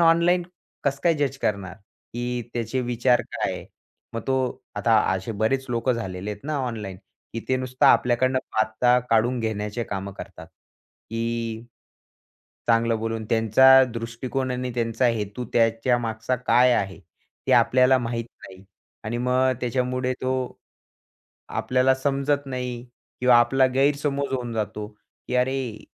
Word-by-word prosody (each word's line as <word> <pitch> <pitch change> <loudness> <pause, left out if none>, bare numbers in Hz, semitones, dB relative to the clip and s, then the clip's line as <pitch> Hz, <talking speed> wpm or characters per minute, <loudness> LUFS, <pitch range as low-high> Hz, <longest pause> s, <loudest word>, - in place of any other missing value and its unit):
Online 170 +2 +4 0.4
कसं 140 0 0
काय 170 -1 +4
जज 145 -2 -1
करणार, 100 -6 -2 0.4
की 120 0 -2
त्याचे 120 +2 -2
विचार 120 0 +2
काय? - - -3 0.5
मग 115 +3 -4 0.5
आता 115 -1 +3 0.2
असे 95 +4 -4
बरेच 110 +6 0
लोकं 120 +2 +1
झालेले 100 -4 -4
आहेत 105 0 -7
ना 150 0 -2
ऑनलाइन, 105 -6 -5 0.4
की 115 - -4
ते 130 - +2
नुसतं 130 0 +1
आपल्याकडनं 130 +2 +4
बाता 110 +3 +2
काढून 115 +3 +3
घेण्याचे 110 +1 -3
काम 100 0 -5
करतात. - - -10
की, 115 0 -6 1.0
चांगलं 115 0 +3
बोलून 115 0 -3
त्यांचा 125 +4 +6
दृष्टिकोन 120 +3 -3
आणि 125 0 -2
त्यांचा 115 +1 +1
हेतू, 110 +1 -2
त्याच्या 115 +1 +2
मागचा 115 +1 -2
काय 125 +1 +4
आहे, 100 -5 -1 0.5
ते - - +2
आपल्याला 130 +1 +5
माहीत 115 -1 -3 0.2
नाही. 95 0 -14 0.4
आणि 115 +2 -2
मग 130 +1 +2
त्याच्यामुळे 125 +1 -1
तो 130 0 0 1.2
आपल्याला 130 +1 +2
समजत 140 +1 0
नाही 125 -2 -4 0.4
किंवा 125 -1 +6
आपला 130 +3 +4
गैरसमज 140 0 +1
होऊन 125 -3 -3
जातो, 105 -1 -3 0.4
की - - -2
अरे, 125 -3 -1
120 Hz, 130 wpm, -24 LUFS, 115-130 Hz, 1.2 s, त्यांचा